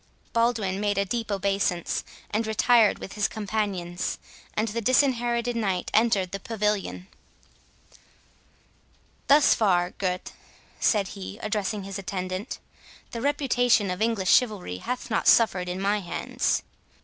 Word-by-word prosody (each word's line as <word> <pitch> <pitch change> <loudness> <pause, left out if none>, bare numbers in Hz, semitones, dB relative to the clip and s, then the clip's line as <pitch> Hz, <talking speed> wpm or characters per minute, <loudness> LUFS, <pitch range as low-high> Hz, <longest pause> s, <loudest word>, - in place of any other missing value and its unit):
Baldwin 230 -5 +1
made 205 -1 0
a 200 - +2
deep 225 +2 -3
obeisance, 195 -3 0 0.3
and 220 +1 0
retired 220 0 +4
with - - -8
his 210 -1 +1
companions; 195 -5 -3 0.4
and 215 +2 0
the 230 +3 -3
Disinherited 240 -1 +2
Knight 195 -6 -1
entered 210 -5 +3
the 195 - -4
pavilion. 210 -3 -2 2.2
"Thus 285 +1 +6
far, 180 -4 +2
Gurth," 185 -2 -3 0.5
said 200 -4 +2
he, 200 0 -8
addressing 210 -1 -2
his 195 0 -6
attendant, 185 +2 -4 0.5
"the 230 - -5
reputation 245 -7 +2
of 180 - -4
English 220 -5 +2
chivalry 210 - +1
hath 250 - -5
not - - 0
suffered 185 -6 +4
in 180 +1 -3
my 200 +2 +1
hands." 180 - -1
210 Hz, 125 wpm, -26 LUFS, 190-230 Hz, 2.2 s, Thus